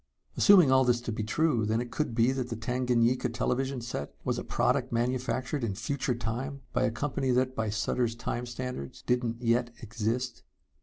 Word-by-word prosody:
Assuming 180 -9 +7
all 130 0 +6
this 120 -1 +3
to 120 - -4
be 110 - -3
true, 120 +1 +1
then 110 +2 +1
it 120 0 -4
could 150 -5 -2
be 120 +2 +4
that 130 -2 -3
the 115 - -3
Tanganyika 125 +1 +1
television 130 0 -1
set 115 -11 -5
was - - -1
a - - -4
product - - +1
manufactured 125 +2 -1
in 105 -4 -1
Future 125 +4 -1
Time 125 +4 -4
by 130 - +2
a - - +2
company 135 +2 -2
that, 130 +1 +2
by 110 -1 -1
Sutter's 115 +2 0
Time 120 +1 -3
standards, 120 - -6
didn't 120 -1 -1
yet 120 +1 +2
exist. 115 +3 -2
120 Hz, 185 wpm, -29 LUFS, 115-130 Hz, -, Assuming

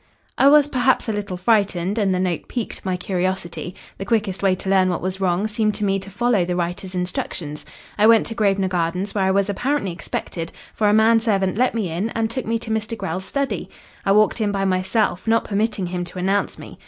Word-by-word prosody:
"I 275 - +6
was 295 0 +6
perhaps 260 -3 +1
a 220 - 0
little 205 -3 -4
frightened 200 0 +1
and 200 -2 +2
the 185 - +1
note 180 -3 -1
piqued 240 -4 -5
my 185 -1 -1
curiosity. 180 -1 -3 0.2
The 195 - -4
quickest 205 -3 0
way 195 -2 +3
to 190 - -8
learn 190 -1 +4
what 175 - -1
was 190 +1 -3
wrong 185 +1 +1
seemed 215 -1 0
to 210 - -2
me 195 0 +1
to 195 +1 -10
follow 230 -1 +1
the 175 0 -2
writer's 180 +2 -3
instructions. 175 -4 -3 0.3
I 215 - +6
went 225 -1 +6
to 230 - -4
Grosvenor 200 -3 +1
Gardens, 180 +2 -1
where 195 -2 +1
I - - +2
was 195 +1 +2
apparently 225 +1 -1
expected, 170 -1 -5 0.2
for 210 -1 +2
a - - +4
man 220 +2 +5
servant 195 -4 0
let 250 +2 +1
me 210 -6 -1
in 185 +7 -1
and 225 0 0
took 260 -1 -4
me 230 +1 +1
to 225 0 -6
Mr. 220 +1 -2
Grell's 190 -1 -4
study. 265 - -2 0.3
I 195 - +2
walked 215 +2 +3
in 210 -1 +1
by 195 -1 -1
myself, 190 +1 0
not 225 0 +3
permitting 210 -1 -1
him 175 0 -3
to 175 - -9
announce 195 +3 0
me. - - -11
195 Hz, 225 wpm, -21 LUFS, 185-220 Hz, 0.3 s, I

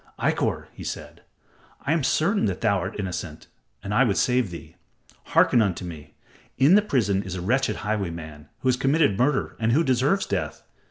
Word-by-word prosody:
"Ikkor," - - 0
he - - -10
said, - - -7 0.6
"I 145 - +2
am 165 -3 0
certain 165 - +2
that 95 -3 -2
thou 100 -4 +2
art 90 +3 -5
innocent, 85 -5 -5 0.4
and 100 - -4
I 120 - +5
would 105 -6 +1
save 125 -4 +2
thee. 85 -4 -10 0.5
Hearken 120 - +4
unto 95 -4 -1
me. 80 -4 -10 0.4
In 140 +6 +5
the 210 - +7
prison 110 - +1
is 95 -2 -6
a 90 - -4
wretched 120 +3 +1
highwayman 85 -7 -4
who 130 - -2
has 125 -1 +3
committed 135 -4 +2
murder 130 +5 0
and 115 +1 +1
who 160 +6 +4
deserves 135 +8 +2
death. 80 -6 -3
110 Hz, 180 wpm, -24 LUFS, 90-135 Hz, 0.6 s, the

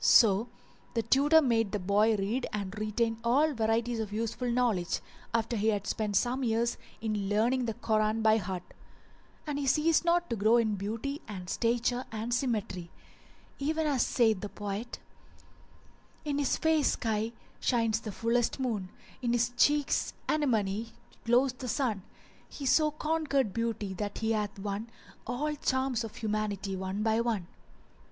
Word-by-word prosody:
So 220 0 +6 0.5
the 230 - +1
tutor 290 +7 +5
made 225 -5 +1
the - - +2
boy 205 +4 +3
read 210 +6 -1
and 200 -1 -4
retain 225 +1 0
all 285 +6 +3
varieties 225 0 0
of 215 -2 -3
useful 230 +3 -2
knowledge, 235 -8 +1 0.3
after 230 0 0
he 215 0 0
had 205 -2 +1
spent 210 0 -2
some 245 +6 +1
years 235 0 +1 0.2
in 210 -3 -1
learning 240 +5 +2
the 225 -2 -2
Koran 215 0 +1
by 220 0 +5
heart; 185 -3 -4
[FN#387] - - -19 0.7
and 295 -2 -2
he 280 - -2
ceased 310 +5 +3
not 345 0 +2
to - - +1
grow 220 +3 +4
in 220 -2 +2
beauty 225 - -3
and 190 -4 -7
stature 240 +4 0
and 225 +2 -3
symmetry, 210 -9 -1 0.7
even 315 +3 0
as 280 -5 +2
saith 220 -6 +2
the 205 - -4
poet:— 205 +4 -5 1.3
In 290 -1 -1
his 285 - +1
face 320 -3 +3
sky 220 -1 -1 0.3
shines 230 -3 +1
the 220 -2 -6
fullest 230 +5 0
moon; 220 -8 -2 0.2
* - - -23
In 240 -1 0
his 240 0 +2
cheeks' 290 +2 +2
anemone 225 -8 +1 0.4
glows 245 +3 +3
the 255 0 -7
sun: 230 -4 0 0.5
He 280 - -7
so 305 +4 +4
conquered 300 -7 0
Beauty 225 -4 -2
that 205 +1 -4
he 225 0 0
hath 210 -2 -1
won 200 +3 -4 0.2
* - - -23
All 285 +6 -1
charms 260 -3 0
of 225 - -7
humanity 210 -3 -2
one 190 +2 -3
by 220 +1 +2
one. 225 -6 -1
230 Hz, 160 wpm, -30 LUFS, 210-255 Hz, 1.3 s, So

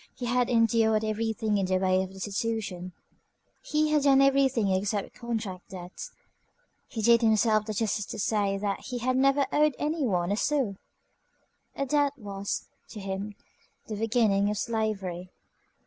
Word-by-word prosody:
He 250 - -5
had 245 0 +1
endured 225 -2 +3
everything 215 -1 -1
in 190 - 0
the 185 0 +2
way 185 0 +2
of 190 0 -5
destitution; 195 -2 -3 0.7
he 305 0 0
had 300 -1 +3
done 275 -1 +5
everything 270 -6 +3
except 200 +2 -1
contract 220 -6 -5
debts. 180 -1 -8 0.8
He 220 -3 -5
did 235 +1 +5
himself 220 -1 +3
the 215 - -2
justice 210 -1 -1
to - - -6
say 200 -2 0
that 200 0 -2
he 250 - -6
had 255 +2 0
never 275 +1 +3
owed 300 -2 +3
any 305 +1 -1
one 180 -3 0
a 205 - 0
sou. 260 -8 0 1.0
A 275 - -1
debt 285 0 +2
was, 200 -3 -4 0.2
to 215 - -8
him, 195 +1 -5 0.5
the 215 - -5
beginning 210 -2 +2
of 210 - -2
slavery. 200 -6 -2
220 Hz, 155 wpm, -28 LUFS, 195-245 Hz, 1.0 s, done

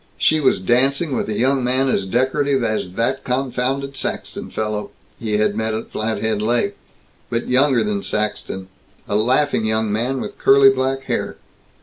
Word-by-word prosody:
She 155 - +3
was 130 -9 +3
dancing 135 - +2
with - - -2
a 105 - -2
young 130 +1 +2
man 130 +2 +1
as 100 -7 0
decorative 130 +4 +1
as 110 -5 -2
"that 125 +6 -1
confounded 135 +2 -2
Saxton - - -4
fellow" 105 -1 -3 0.3
he 110 -2 -1
had 105 -1 +1
met 110 0 -1
at 110 - -6
Flathead 110 -1 -1
Lake, 120 +2 0 0.5
but 115 0 -2
younger 130 0 +3
than 210 -1 -1
Saxton, 105 - -3 0.4
a - - -1
laughing 125 +3 +2
young 110 -1 0
man, 120 +5 -1
with - - -7
curly 135 0 +6
black 135 0 -1
hair. - - -3
125 Hz, 160 wpm, -20 LUFS, 110-135 Hz, 0.5 s, curly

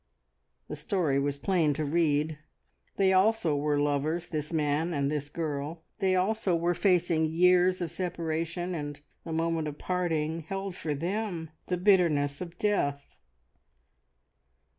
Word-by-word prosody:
The - - -5
story 165 -9 0
was 140 0 -1
plain 165 -4 +1
to 155 - -2
read. 155 -1 +1 0.6
They 190 -1 +4
also 190 -4 +3
were 145 0 +1
lovers 145 +4 0
this 155 -1 -3
man 155 +1 0
and 140 0 0
this 145 -1 -3
girl. 155 +1 -4 0.2
They 190 -1 +2
also 190 0 +1
were 170 +1 +1
facing 175 -3 +2
years 180 +2 +4
of 170 -3 -2
separation, 170 0 -3
and 145 -3 -5 0.2
the 165 - -7
moment 165 -1 0
of 150 -1 -6
parting 165 -3 -1
held 195 +3 -5
for 155 -4 -3
them 175 0 -3 0.2
the 180 - 0
bitterness 170 -7 +3
of 175 -1 -7
death. 145 -10 -1
165 Hz, 140 wpm, -29 LUFS, 150-180 Hz, 0.6 s, They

